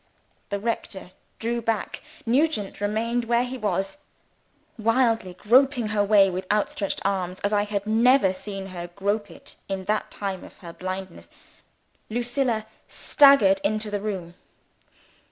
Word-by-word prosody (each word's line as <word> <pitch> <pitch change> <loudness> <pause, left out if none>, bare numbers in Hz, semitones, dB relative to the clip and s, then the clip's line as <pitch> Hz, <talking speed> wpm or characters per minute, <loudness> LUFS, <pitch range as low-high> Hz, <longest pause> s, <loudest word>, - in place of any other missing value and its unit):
(The 200 -1 -2
rector 200 -4 -4 0.3
drew 235 +1 -2
back; 225 -2 -2 0.2
Nugent 245 -5 0
remained 230 +3 0
where 235 +1 +2
he 250 +1 -5
was.) 210 +1 -2 0.8
Wildly 225 -4 +1
groping 245 +3 +3
her 210 -1 +1
way 200 -1 +5
with 185 0 -3
outstretched 210 -1 -1
arms, 185 -2 -1
as 205 +1 0
I 205 0 +2
had 205 -1 -3
never 225 -1 +4
seen 195 0 -6
her 175 -1 -5
grope 200 +3 -2
it 165 - -12
in 190 -1 -3
the 215 +2 +1
time 195 -2 -5
of - - -14
her 170 -2 -10
blindness, 185 0 -6 0.8
Lucilla 240 -1 -1 0.2
staggered 225 -10 +5
into 215 +1 -1
the 205 -1 -2
room. 190 -5 -4
210 Hz, 135 wpm, -25 LUFS, 195-230 Hz, 0.8 s, way